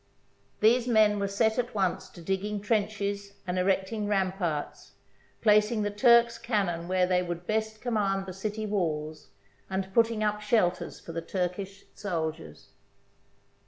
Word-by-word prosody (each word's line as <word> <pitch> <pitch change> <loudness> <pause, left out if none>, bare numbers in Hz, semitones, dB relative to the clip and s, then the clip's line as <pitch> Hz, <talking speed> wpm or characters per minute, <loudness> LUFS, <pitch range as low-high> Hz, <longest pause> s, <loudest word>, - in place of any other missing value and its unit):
These 240 +3 +4
men 215 -3 +4
were 200 - 0
set 220 +3 +1
at 245 -2 -2
once 190 -3 0
to 170 - -13
digging 195 +3 -2
trenches 205 -1 -1
and 180 0 -1
erecting 195 +3 0
ramparts, 185 -6 -2 0.5
placing 210 0 +4
the 205 - -1
Turks' 235 +1 +5
cannon 195 -8 -1
where 185 0 +2
they 180 0 +2
would 175 -1 -5
best 220 +1 -2
command 200 -5 0
the 185 - -7
city 215 +3 -4
walls, 155 -6 -2 0.4
and 190 0 -3
putting 230 -1 +3
up 210 0 0
shelters 205 -5 0
for - - -9
the 165 0 -3
Turkish 185 +3 -4
sol 165 -6 -2
diers. 160 0 -14
200 Hz, 145 wpm, -28 LUFS, 180-215 Hz, 0.5 s, Turks